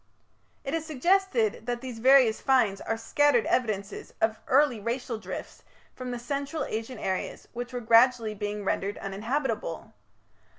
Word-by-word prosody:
It 275 - -4
is 330 -1 -1
suggested 310 - +1
that 240 -1 -2
these 250 -3 -7
various 255 -2 +5
finds 230 -8 +2
are 225 - -2
scattered 245 +2 +2
evidences 210 -5 -2
of 220 0 +1
early 270 -3 +3
racial 235 +1 -3
drifts - - -7 0.3
from 255 -1 -7
the 245 - -3
Central 280 +4 -3
Asian 225 +3 -5
areas 190 -1 -3
which 245 0 -5
were 245 -1 -4
gradually 230 -1 +4
being 205 0 -4
rendered 195 +1 -1
uninhabitable. 215 - -3
240 Hz, 140 wpm, -27 LUFS, 220-265 Hz, 0.3 s, various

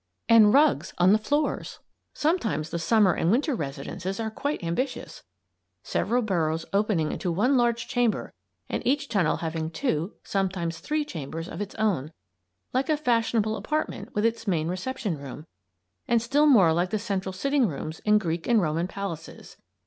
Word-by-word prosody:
AND 220 -2 +7
RUGS 275 - +3
ON 180 +2 +5
THE 215 - +4
FLOORS! 290 +8 -1 0.4
Sometimes 225 - 0
the 170 - -2
Summer 195 +2 +4
and 165 - 0
Winter 275 - +2
residences 170 - -4
are 220 -1 -2
quite 285 +1 -3
ambitious, 210 +11 -3 0.6
several 245 +1 0
burrows 165 -5 0
opening 200 -6 +1
into 180 - -2
one 230 +11 +2
large 235 -2 +1
chamber 245 -4 0 0.3
and - - -2
each 285 +2 0
tunnel 195 -8 +1
having 160 0 -2
two, 170 - -2
sometimes 185 -4 -2
three, 300 - -1
chambers 165 - -6
of 195 - -6
its 205 - -5
own 185 -10 0 0.6
like 260 +3 0
a 305 - +3
fashionable 230 -5 +1
apartment 305 +10 -3
with 210 +1 +1
its 230 -1 -1
main 165 -4 0
reception 195 - -3
room, 140 +2 -8 0.6
and 235 - +3
still 280 +6 +2
more 195 - +6
like 175 +2 +1
the 215 - 0
central 195 -3 -3
sitting 275 +6 +1
rooms 155 0 -5
in 210 0 +3
Greek 170 -4 -2
and 235 -2 +4
Roman 165 -1 0
palaces. 185 -5 -7
205 Hz, 165 wpm, -26 LUFS, 165-240 Hz, 0.6 s, AND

